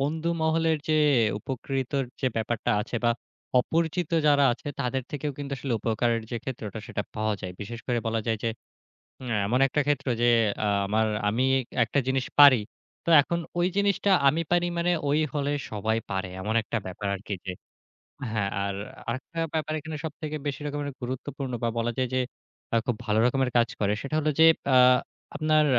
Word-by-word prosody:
বন্ধু 160 +4 -1
মহলের 160 0 +2
যে 155 0 +3 0.4
উপকৃতর 135 +3 -2 0.2
যে 130 - +1
ব্যাপারটা 115 0 -1
আছে 120 - -4
বা 120 - +5 0.5
অপরিচিত 165 +3 -1 0.2
যারা 145 -1 +5
আছে 125 - -7
তাদের 130 0 -1
থেকেও 145 0 -3
কিন্তু 140 -1 -5
আসলে 135 -1 -3
উপকারের 115 0 0
যে 120 - -2
ক্ষেত্রেটা 110 -5 -5
সেটা 105 - -3
পাওয়া 110 0 0
যায়। 90 -2 -5
বিশেষ 115 +3 -6
করে 125 -2 +1
বলা 115 0 0
যায় 110 -1 0
যে, 115 - +2 0.8
আ - - +1
এমন 125 +5 +1
একটা 140 +2 0
ক্ষেত্র। 145 -1 0 0.2
যে, 120 - +5 0.4
আ - - +2 0.2
আমার 110 +2 +2 0.2
আমি 115 +5 +1 0.4
একটা 115 +5 -1
জিনিস 130 -1 +1
পারি। 140 -5 +9 0.4
তো - - -8
এখন 170 +4 -2 0.2
ওই 175 - +3
জিনিসটা 200 0 +2 0.2
আমি 155 +4 +2
পারি 175 0 +3
মানে 175 +1 +2 0.2
ওই 145 +2 +3 0.2
হলে 145 -1 0 0.2
সবাই 110 +1 0
পারে। 95 -1 -2
এমন 110 +3 -2
একটা 115 - -4
ব্যাপার 95 +2 -5
আরকি 100 +1 -5
যে। 95 - -3 0.8
হ্যাঁ। 105 -3 0
আর 100 0 -2 0.3
আরেকটা 130 +7 -4
ব্যাপার 155 -1 -1
এখানে 155 +1 -6
সবথেকে 155 -1 -4
বেশি 145 +1 -3
রকমের 145 0 -3
গুরুত্বপূর্ণ 130 +2 -4
বা 115 - +2
বলা 115 +1 0
যায় 130 -1 0
যে, 130 - +3 0.5
আ - - +4
খুব 125 - 0
ভালো 110 -1 +2
রকমের 130 0 +1
কাজ 120 -1 +3
করে। 105 0 +2
সেটা 140 +2 -3
হলো 155 0 +1
যে, 160 - +8 0.3
আ - - +8 0.6
আপনার 155 0 +3
130 Hz, 180 wpm, -27 LUFS, 115-150 Hz, 0.8 s, পারি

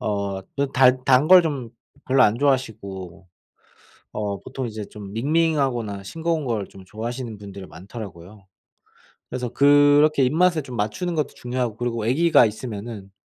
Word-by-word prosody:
어 100 -4 -2 0.2
그 140 -1 0
단 130 0 +4
단 130 +2 +4
걸 185 -1 +9
좀 135 -8 -3 0.4
별로 130 0 +4
안 110 0 +3
좋아하시고 100 -9 -2 0.9
어 100 -2 -3
보통 130 -2 -5
이제 110 -2 -6
좀 100 -1 -10
밍밍하거나 135 -7 0
싱거운 165 +4 -2
거를 110 -5 -2
좀 95 - -14
좋아하시는 115 +1 -6
분들이 100 -1 -10
많더라고요. 100 -1 -11 0.8
그래서 125 -1 -3
그렇게 145 +1 +5
입맛에 165 +3 +2
좀 125 -2 -8
맞추는 110 - -2
것도 150 -2 0
중요하고 125 -3 -3
그리고 115 -2 -3
아기가 145 +3 +4
있으면은 105 -2 -7
120 Hz, 330 characters per minute, -23 LUFS, 105-140 Hz, 0.9 s, 걸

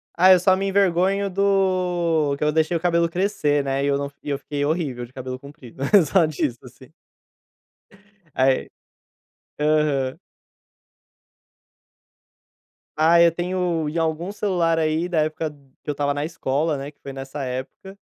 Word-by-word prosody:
Ah, 185 +2 +6
eu 185 - +7
só 185 +1 +4
me 195 +1 -2
envergonho 195 0 +2
do 180 -6 +1
que - - -3
eu 150 - +2
deixei 160 +2 +1
o - - -6
cabelo 170 0 +1
crescer, 165 -6 0
né, 135 0 -1
e - - +1
eu 140 -1 +2
não 140 0 -4
e - - -7
eu 140 - 0
fiquei 145 +1 -4
horrível 145 -6 -2
de 125 - -25
cabelo 130 -1 -6
comprido. 135 -3 -13 0.3
Só 185 -4 +5
disso, 140 -5 -2
assim. 130 +3 -16 1.4
Ai 130 0 +1 0.9
aham. 150 -3 +1 2.8
Ah, 160 +2 +4
eu 170 0 +6
tenho 175 -2 -1
em 155 - -5
algum 165 +3 -1
celular 175 -6 0
aí 160 +2 0
da 165 -3 +1
época 155 +1 -2 0.3
que - - -8
eu 145 - +1
estava 145 0 -1
na 145 - -3
escola, 155 -1 -1
né, 140 +2 -6
que 145 - -42
foi 140 - -7
nessa 135 +1 -6
época. 130 +10 -7
155 Hz, 155 wpm, -22 LUFS, 140-175 Hz, 2.8 s, eu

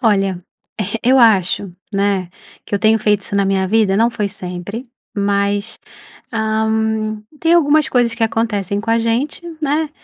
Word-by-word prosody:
Olha, 195 -6 +2 0.4
eh, 205 +2 -2
eu 260 +2 +4
acho, 200 -4 +3 0.2
né, 195 -2 0 0.4
que - - -4
eu - - +2
tenho 220 +2 +4
feito 210 -1 +2
isso 200 - -5
na 200 - +3
minha 190 -1 +1
vida, 210 -2 +3
não 230 +3 +3
foi 210 -3 -2
sempre, 190 +3 -6 0.3
mas, 200 0 0 0.5
hã, 220 0 0 0.2
tem 330 0 +3
algumas 305 -3 +4
coisas 240 -3 +2
que 230 - -4
acontecem 205 -3 -1
com 225 +2 -3
a 230 - +3
gente, 230 +8 -1 0.2
né, 300 +1 0
215 Hz, 160 wpm, -18 LUFS, 200-230 Hz, 0.5 s, eu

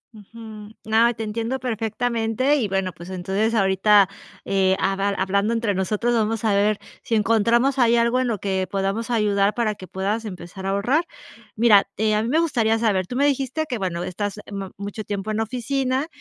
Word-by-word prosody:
Ujú. 215 0 -11 0.2
No, 225 +2 +4
y - - -1
te 225 - -5
entiendo 230 +4 -3
perfectamente. 230 +2 0
Y 225 -6 0
bueno, 190 -2 -1
pues, 170 +3 -11
entonces 195 +5 -1
ahorita, 195 0 +4 0.4
eh, 190 -1 +2
haba 195 +1 0
hablando 200 +3 0
entre 225 -3 0
nosotros, 210 +5 0
vamos 225 0 0
a 210 - +3
ver 205 +1 +2 0.2
si 230 - -1
encontramos 230 +5 +2
ahí 235 -1 +4
algo 235 +2 +2
en 255 - 0
lo 225 -3 -1
que 190 -2 -1
podamos 195 +4 -2
ayudar 210 -3 +2
para 225 -3 0
que 185 -2 -11
puedas 195 +5 -2
empezar 190 0 -7
a - - 0
ahorrar. 245 - +1 0.5
Mira, 215 -3 +5 0.3
a 215 - +2
mí 230 - -2
me 310 - +2
gustaría 230 -9 +1
saber, 200 -5 +1
tú 250 - -6
me 280 +2 +2
dijiste 280 +2 0
que, 245 -6 -3
bueno, 175 -2 -2
estás, 205 +3 -4
em, 200 -1 -6
m 190 - -7
mucho 205 +2 -6
tiempo 205 +1 -4
en 215 - -1
oficina 260 +4 -1
215 Hz, 190 wpm, -22 LUFS, 195-235 Hz, 0.5 s, Mira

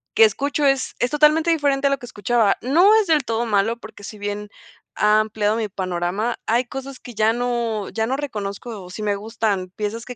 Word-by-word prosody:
que 450 - +8
escucho 290 -7 0
es 270 -1 +1
es 245 - +1
totalmente 305 +3 +4
diferente 285 -3 +2
a - - +3
lo 275 -1 0
que - - -9
escuchaba. 230 -2 +1
No 340 - +5
es 410 - -5
del 310 -3 +3
todo 230 0 -1
malo, 220 +1 +1
porque 220 -3 -12
si 210 +1 -8
bien 205 0 -5 0.5
ha 210 0 +4
ampliado 215 0 0
mi 225 -2 -2
panorama, 185 +4 -2
hay 240 +3 +1
cosas 270 +1 -7
que 245 - -11
ya 215 +1 +3
no 235 -3 -2
ya 220 -1 -1
no 255 +4 -1
reconozco, 215 -5 -5
o 180 - -11
si 215 - -7
me 205 -1 0
gustan, 205 -3 -2
piezas 215 +2 -4
que 250 - -8
230 Hz, 215 wpm, -22 LUFS, 210-270 Hz, 0.5 s, que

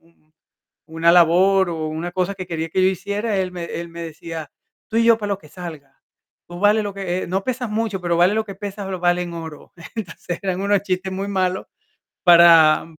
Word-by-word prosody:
un 165 -2 -31 0.5
una 165 +1 +2
labor 180 +2 +4
o 160 -2 -3
una 160 +3 -4
cosa 185 +2 -1
que 185 -1 -6
quería 165 -1 -3
que 185 +3 0
yo 185 - +5
hiciera, 200 +4 -2
él 185 -1 -1
me 175 -2 -6
él 170 0 -6
me 170 0 -7
decía: 160 -1 -8 0.4
"Tú 225 - -2
y 230 - +4
yo 230 -1 +6
para 205 -2 -4
lo 200 - -1
que 150 - -17
salga, 155 -4 -10 0.5
tú 175 0 -9
vales 210 +1 +3
lo 205 -1 -4
que 185 -2 -3
eh, - - -6
no 190 +2 -1
pesas 255 -2 -3
mucho, 215 -2 -2
pero 175 -1 -1
vales 175 +4 +3
lo 220 0 0
que 195 - -8
pesas, 200 0 -6
lo 185 -1 -4
vales 175 0 +1
en 170 - -8
oro". 160 -2 -9 0.2
Entonces 175 -4 -5
eran 190 -1 -2
unos 200 -1 +2
chistes 190 -1 -2
muy 195 +1 -4
malos 185 -1 -1 0.6
para 170 -3 +7
180 Hz, 215 wpm, -21 LUFS, 170-200 Hz, 0.6 s, para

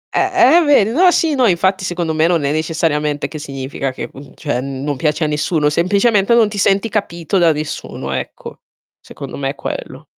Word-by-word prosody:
Eh 380 - +2
eh, 350 -3 +5
vedi. 275 -8 +4
No, 355 +9 +5
sì, 330 -3 +1
no, 255 -4 +3
infatti 190 +1 +1
secondo 175 -3 -2
me 155 +1 +2
non 170 -3 +1
è 140 - 0
necessariamente 155 -2 -1
che 155 - -8
significa 135 -1 -5
che, 130 - -7
mhmm, 140 0 -13
cioè 145 -6 -3
non 135 +2 -4
piace 150 +3 -1
a - - +1
nessuno, 150 0 0
semplicemente, 200 +6 +2
non 225 -3 +4
ti 205 -1 -5
senti 195 +3 +2
capito 195 -4 -2
da 170 -2 +4
nessuno, 150 - -5
ecco. 65 -1 -6 0.4
Secondo - - -9
me 135 -1 -2
è 140 - -5
quello. 135 - -7
165 Hz, 195 wpm, -17 LUFS, 145-205 Hz, 0.4 s, eh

